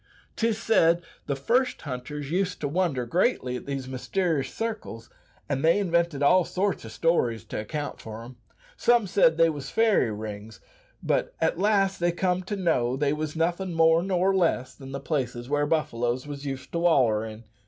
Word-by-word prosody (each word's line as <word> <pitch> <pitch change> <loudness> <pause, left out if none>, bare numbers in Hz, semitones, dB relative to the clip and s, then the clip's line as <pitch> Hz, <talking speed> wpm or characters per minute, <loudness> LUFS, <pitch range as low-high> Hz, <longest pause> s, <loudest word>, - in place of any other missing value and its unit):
Tis 225 -1 0
said 175 -7 +3 0.2
the 140 - 0
first 245 - +1
hunters 145 +2 -6
used 180 +1 0
to 145 - 0
wonder 150 -5 0
greatly 130 - 0
at 125 - -7
these 135 -2 -3
myster'ous 140 +3 -1
circles, 220 - -5 0.4
and 140 -1 -2
they 165 +3 +5
invented 170 -6 +1
all 180 +5 +5
sorts 195 +4 -1
o' 110 - -8
stories 120 - +1
to - - -5
account 145 +7 -5
for 110 +1 -8
'em. 120 +1 -12 0.4
Some 240 - +3
said 165 -4 +3
they 165 0 +5
wos 145 -2 -6
fairy 220 - +3
rings, 105 0 -7 0.4
but - - 0
at - - 0
last 195 -1 +2
they 175 0 +2
comed 180 +1 -1
to 205 - -2
know 130 -10 +1
they 145 0 +1
wos 155 0 -4
nothin' 175 +2 -1
more 165 0 +5
nor 190 +1 +1
less 135 -8 +1
than 135 0 -11
places 125 -5 -2
where 145 0 +1
buffaloes 125 -5 -1
wos 145 -1 -7
used 135 -2 -5
to 170 - -1
waller 130 -11 +3
in. 110 0 -8
155 Hz, 175 wpm, -26 LUFS, 130-180 Hz, 0.4 s, they